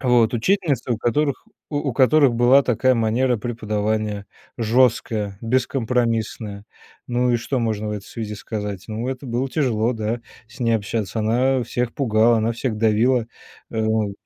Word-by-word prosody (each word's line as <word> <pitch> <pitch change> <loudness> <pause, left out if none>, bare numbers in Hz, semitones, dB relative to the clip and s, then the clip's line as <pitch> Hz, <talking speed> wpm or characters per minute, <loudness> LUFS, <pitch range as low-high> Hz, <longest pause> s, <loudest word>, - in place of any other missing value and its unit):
Вот. 125 -3 +3
Учительница 140 - +1
у 115 - -2
которых 140 - 0 0.2
у 145 - -1
у 145 -2 -2
которых 135 0 +4
была 125 +4 +5
такая 130 +1 +2
манера 120 +2 +1
преподавания: 105 -2 -2 0.3
жесткая, 110 -3 +1
бескомпромиссная. 115 -4 -1 0.4
Ну 125 0 +1
и 120 - +3
что 125 +3 -2
можно 110 -2 -1
в - - -3
этой 105 -1 -5
связи 105 -1 -6
сказать? 105 -3 -5
Ну 110 +3 -3
это 130 +1 -5
было 125 +2 -1
тяжело, 125 -6 0
да, 115 +1 -3 0.3
с 120 +2 -16
ней 115 -1 +2
общаться 110 +1 -2
она, 125 +5 +2
а, - - -1
всех 120 +1 -2
пугала, 115 -3 +3
она 110 +1 0
всех 115 -1 -3
давила, 115 +3 +2 0.4
э, 110 - -2
в 110 -2 0
115 Hz, 160 wpm, -22 LUFS, 110-125 Hz, 0.4 s, была